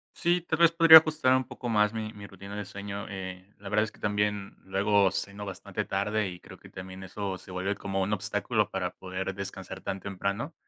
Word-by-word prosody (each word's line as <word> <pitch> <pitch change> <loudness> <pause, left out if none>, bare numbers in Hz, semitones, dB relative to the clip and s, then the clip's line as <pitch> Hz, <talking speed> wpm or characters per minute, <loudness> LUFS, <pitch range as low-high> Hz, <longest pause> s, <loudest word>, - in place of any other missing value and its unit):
Sí, 175 0 +2
tal 165 -1 -2
vez 170 -1 +7
podría 165 -1 +11
ajustar 155 -5 +4
un 130 - -2
poco 125 -2 -6
más 105 -1 +3
mi 110 -1 -4
mi 100 -2 -10
rutina 100 +1 -10
de 105 -1 -4
sueño, 100 +1 -6
eh, 95 -1 -7
la 100 0 -8
verdad 105 +1 +3
es 110 - -9
que - - -20
también 105 -1 -1
luego 100 +1 +3
ceno 100 +1 -4
bastante 95 - -5
tarde 105 +2 0
y 90 -1 -10
creo - - -12
que - - -14
también 95 0 -9
eso 95 0 -4
se - - -16
vuelve 95 +2 -1
como 95 -1 -2
un 95 +2 -1
obstáculo 100 -1 0
para - - -3
poder 95 +1 -4
descansar 95 -1 -7
tan 95 0 -4
temprano, 100 - -3
100 Hz, 215 wpm, -28 LUFS, 95-105 Hz, -, podría